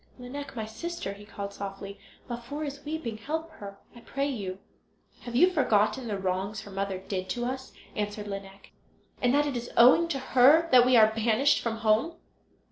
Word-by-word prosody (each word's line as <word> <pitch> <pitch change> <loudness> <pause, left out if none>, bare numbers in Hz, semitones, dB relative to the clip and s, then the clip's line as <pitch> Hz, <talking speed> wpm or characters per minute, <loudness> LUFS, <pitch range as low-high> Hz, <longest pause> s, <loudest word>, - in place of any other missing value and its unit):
"Lineik, 265 +2 -8
my 220 -2 -3
sister," 220 - -5
he 205 +1 -13
called, 200 -1 -7
softly, 200 0 -7 0.3
"Laufer 245 +5 -5
is 285 -1 -6
weeping; 295 -8 -4
help 320 +6 -4
her, 200 -9 -10 0.2
I - - -11
pray 275 +4 -3
you." 200 -9 -4 0.7
"Have 240 -1 -6
you 360 +8 +5
forgotten 240 - +2
the 205 -2 -2
wrongs 195 +2 -2
her 205 - -11
mother 195 0 -2
did 185 0 -5
to 240 +5 -2
us" 260 +1 -5 0.2
answered 205 0 -3
Lineik, 195 -1 -8 0.5
"and 245 - +3
that 295 +1 +3
it 285 -3 -2
is 240 0 -4
owing 255 +8 +7
to 320 -5 -2 0.2
her 285 +6 +6
that 250 -1 +7
we 255 - +5
are 220 -1 +6
banished 225 +5 +3
from 225 -1 -3
home?" 225 +11 +2
235 Hz, 185 wpm, -28 LUFS, 200-275 Hz, 0.7 s, owing